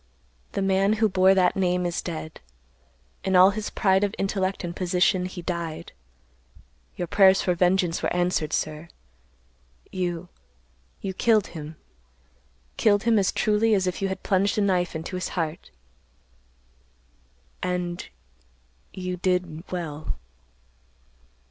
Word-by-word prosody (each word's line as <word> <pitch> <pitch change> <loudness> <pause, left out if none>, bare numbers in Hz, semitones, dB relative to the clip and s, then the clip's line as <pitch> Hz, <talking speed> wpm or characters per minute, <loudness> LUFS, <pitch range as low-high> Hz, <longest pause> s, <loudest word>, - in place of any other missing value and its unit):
The 195 - -1
man 195 +2 +3
who 220 0 +2
bore 190 0 +4
that 180 -1 +3
name 180 -2 +1
is 175 -1 -1
dead. 160 -2 -6 0.8
In 190 -1 0
all 185 +2 +8
his 210 +1 -4
pride 190 0 +2
of 205 - -1
intellect 195 -1 -1
and 175 0 -5
position 180 0 +1
he 180 -1 -8
died. 170 -3 -4 1.0
Your 175 - -3
prayers 195 +1 +5
for 180 - +2
vengeance 180 0 +1
were - - -1
answered, 175 -3 0
sir. 155 +2 -2 1.0
You—you 65 - -7
killed 220 0 +3
him; 155 -1 -7 1.0
killed 205 -1 +3
him 230 -2 +4
as 195 - +2
truly 215 +1 +2
as 190 -2 +1
if 180 +1 -2
you 195 - +1
had 190 - -5
plunged 200 +2 +1
a - - +3
knife 180 -4 +1
into 165 +4 -4
his 185 - -3
heart; 160 -1 -3 1.9
and—you—did—well." 165 - -5
180 Hz, 120 wpm, -25 LUFS, 165-195 Hz, 1.9 s, all